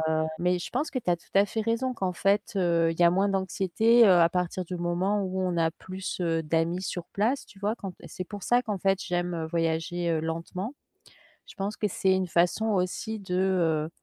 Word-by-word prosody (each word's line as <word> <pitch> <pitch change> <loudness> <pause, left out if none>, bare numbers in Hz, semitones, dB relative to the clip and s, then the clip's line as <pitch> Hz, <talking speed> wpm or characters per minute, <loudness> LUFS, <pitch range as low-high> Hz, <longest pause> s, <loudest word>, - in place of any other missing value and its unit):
heu, 155 - +1 0.2
mais 180 0 +1
je - - -6
pense 305 - -1
que 255 - -4
tu 180 - -3
as 175 - +2
tout - - -24
à 200 +1 +6
fait 220 - -4
raison, 230 +4 0
qu'en 190 -6 -2
fait, 200 +4 +1
heu, 170 -3 +2
il 165 - -7
y - - +7
a 170 - +7
moins 195 +2 +2
d'anxiété, 195 +4 +3
heu, 200 - +6
à 165 - +5
partir 180 +1 -2
du 180 +1 -5
moment 180 +4 0
où 185 0 -2
on 180 -2 -1
a 165 -1 +2
plus, 185 +2 -6
heu, 165 -1 +1
d'amis 165 +3 0
sur 180 -2 -4
place, 230 +7 0
tu 195 - -17
vois? 210 +2 0
Quand 195 -5 -6
t - - -16
c'est 185 - -6
pour 200 +1 -8
ça 245 +1 +3
qu'en 210 -5 -3
fait 195 +1 +1
j'aime, 175 0 -1
heu, 160 -1 -3
voyager, 165 +1 -1
heu, 160 -1 +1
lentement. 170 - -4 0.7
Je - - -13
pense 200 +2 -3
que 210 - 0
c'est 190 0 +2
une 190 -1 0
façon 175 +6 +2
aussi 210 +2 -1
de, 185 -3 -5
heu, 170 -5 +1
185 Hz, 235 wpm, -27 LUFS, 170-200 Hz, 0.7 s, y